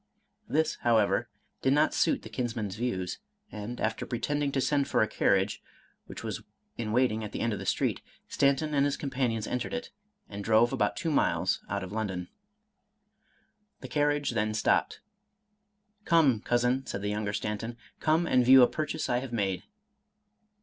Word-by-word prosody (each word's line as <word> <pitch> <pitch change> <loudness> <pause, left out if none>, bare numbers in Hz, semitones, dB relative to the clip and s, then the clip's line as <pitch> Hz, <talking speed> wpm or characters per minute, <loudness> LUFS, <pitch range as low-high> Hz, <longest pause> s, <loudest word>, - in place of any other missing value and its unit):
This, 160 +1 +1
however, 115 -3 +2 0.3
did 135 - +3
not 150 +2 +4
s;iit 165 - +1
the - - -9
kinsman's 115 -6 -3
views; 95 -6 -3 0.3
and, 110 +3 -6
after 110 0 -1
pretending 145 +4 -1
to 135 - +1
send 140 +1 +1
for - - +3
a - - 0
carriage 95 0 +1 0.5
(which - - -8
was - - -4 0.3
in 110 -2 -3
waiting 115 -2 +2
at 105 - -7
the - - -3
end 115 -1 0
of 100 - -4
the - - -6
street), - - 0 0.3
Stanton 140 +2 +1
and 140 -1 +3
his 145 - 0
companions 130 -6 -1
entered 125 - -3
it, 245 - -5 0.4
and 100 0 -7
drove 115 +2 +4
about 105 -1 +1
two 165 -3 -2
miles 145 - +1
out 100 -1 -2
of 95 - -7
London. 95 -5 -3 1.5
The - - -7
carriage 145 -1 +1
then 110 -2 -1
stopped. 105 - +1 1.0
Come, 155 - +4
Cousin," 125 +3 +1
said 100 - -4
the 105 - -1
younger 105 0 -2
Stanton, 105 +3 -4
— - - -24
" - - -44
come 160 +2 +2
and 130 -6 +3
view 130 +1 +8
a - - +7
purchase 155 -1 -3
I 120 - +1
have 130 -1 -7
made." 100 -5 -1
120 Hz, 175 wpm, -29 LUFS, 105-140 Hz, 1.5 s, view